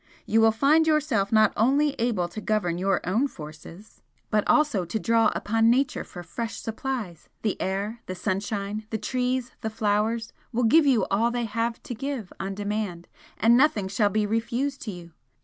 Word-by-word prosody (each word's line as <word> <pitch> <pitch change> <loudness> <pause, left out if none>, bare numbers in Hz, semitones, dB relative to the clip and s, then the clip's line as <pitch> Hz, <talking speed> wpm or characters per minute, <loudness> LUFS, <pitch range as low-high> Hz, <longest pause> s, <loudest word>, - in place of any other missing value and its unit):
You 225 +1 +3
will 225 0 +6
find 295 +8 +3
yourself 280 -11 +1
not 215 -1 +4
only 280 +6 +3
able 225 -7 0
to 215 - -7
govern 200 -6 0
your 195 0 0
own 225 +10 +2
forces 165 - -12 0.3
but 210 -1 +3
also 290 -11 +3
to 175 +6 -3
draw 230 +1 +3
upon 225 +1 +2
Nature 255 +2 +1
for 175 - -10
fresh 225 +7 -5
supplies 225 - -5
the 215 - 0
air, 200 +4 -2
the 185 - -4
sunshine, 200 +2 -3
the 220 - -2
trees, 255 +2 -1
the 220 - -2
flowers, 220 +1 0 0.2
will 245 0 0
give 295 +7 +5
you 255 -5 +3
all 220 +4 +3
they 240 0 -2
have 230 +1 -2
to 275 - -5
give 250 -4 -5
on 195 0 -4
demand 205 -4 -3 0.3
and 230 +3 +5
nothing 240 -7 +3
shall 205 +2 +1
be 215 +1 +1
refused 235 +6 -1
to 215 - -4
you. 175 -2 -10
220 Hz, 180 wpm, -26 LUFS, 200-245 Hz, 0.3 s, will